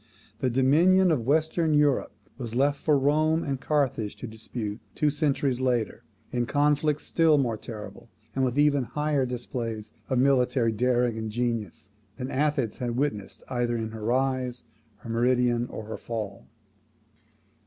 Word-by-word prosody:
The 130 - +1
dominion 165 +9 +4
of 125 -7 0
Western 160 +1 +2
Europe 145 -2 +2 0.3
was 120 -3 -5
left 140 +2 +2
for 150 -2 +3
Rome 155 +4 +2
and 135 -2 -3
Carthage 135 -8 0
to - - -8
dispute 110 -1 -6 0.2
two 150 -1 +2
centuries 140 -3 0
later, 120 -5 0 0.3
in 120 -1 -1
conflicts 150 +1 +2
still 160 -2 +4
more 120 -5 +1
terrible, 110 +1 -9 0.3
and 135 - +1
with 130 0 0
even 145 -2 +4
higher 150 0 0
displays 115 -3 -4 0.2
of 130 - +1
military 125 -2 +3
daring 120 0 +1
and 110 0 -4
genius, 115 -4 -3 0.3
than 130 +1 -4
Athens 140 -5 0
had 120 -1 -3
witnessed 130 -8 -2
either 120 -1 -1
in 110 -1 -3
her 110 -1 -8
rise, 130 +1 0 0.3
her 110 - -11
meridian, 120 0 +2
or 110 - -7
her 110 - -6
fall. 105 -4 -6
125 Hz, 150 wpm, -27 LUFS, 115-145 Hz, 0.3 s, dominion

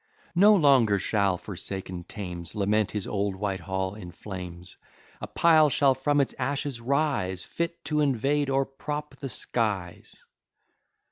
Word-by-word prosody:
No 205 +5 +6
longer 135 - +5
shall 100 -1 +1
forsaken 95 -1 -6
Thames 90 -3 -7
Lament 105 0 +1
his 105 -3 -4
old 100 -1 -1
Whitehall 95 -1 -2
in 90 -4 -9
flames; 90 -2 -8 0.5
A - - -4
pile 160 -2 +5
shall 135 -1 +4
from 145 +2 +1
its 140 - +1
ashes 135 -1 -2
rise, 120 - 0
Fit 170 -1 -4
to 150 0 0
invade 140 +1 +1
or 135 0 +2
prop 150 +2 -6
the 135 - -5
skies." 105 -7 -3
110 Hz, 135 wpm, -27 LUFS, 95-145 Hz, 0.5 s, No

